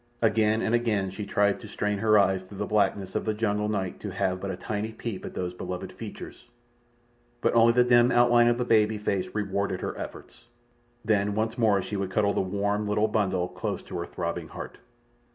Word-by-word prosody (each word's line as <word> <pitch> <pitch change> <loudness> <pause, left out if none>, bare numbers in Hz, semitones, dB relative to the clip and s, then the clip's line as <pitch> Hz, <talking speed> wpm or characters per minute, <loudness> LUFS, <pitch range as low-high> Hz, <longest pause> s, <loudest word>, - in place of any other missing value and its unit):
Again 110 0 +3
and 110 - 0
again 110 -5 +1
she 100 +2 -6
tried 100 -1 +2
to 110 - -10
strain 105 0 -2
her 110 0 +4
eyes 95 -2 +3
through 95 +2 -12
the 105 - -2
blackness 100 -2 0
of - - -1
the 110 -1 -1
jungle 105 -1 0
night 95 -4 -2
to - - -5
have 95 0 -1
but 100 - -3
a 95 - -4
tiny 110 +2 -4
peep 110 -3 -5
at - - -8
those 90 -1 -3
beloved 90 0 -6
features, - - -9 0.9
but - - +1
only 115 0 +6
the 125 +1 +5
dim 120 0 +5
outline 120 -1 +5
of 120 0 +3
the 125 - -1
baby 110 -2 +3
face 100 -3 -1
rewarded 100 -2 -1
her - - -3
efforts. - - -9 0.6
Then 105 -2 +1
once 110 +1 -1
more 105 -5 +2
she 105 - -4
would 95 -1 -2
cuddle 100 +1 +1
the - - +1
warm, 100 +2 -1
little 105 +1 +2
bundle 95 -4 0
close - - -4
to - - -6
her 85 - -4
throbbing 85 -1 -4
heart. - - -9
105 Hz, 205 wpm, -27 LUFS, 95-110 Hz, 0.9 s, only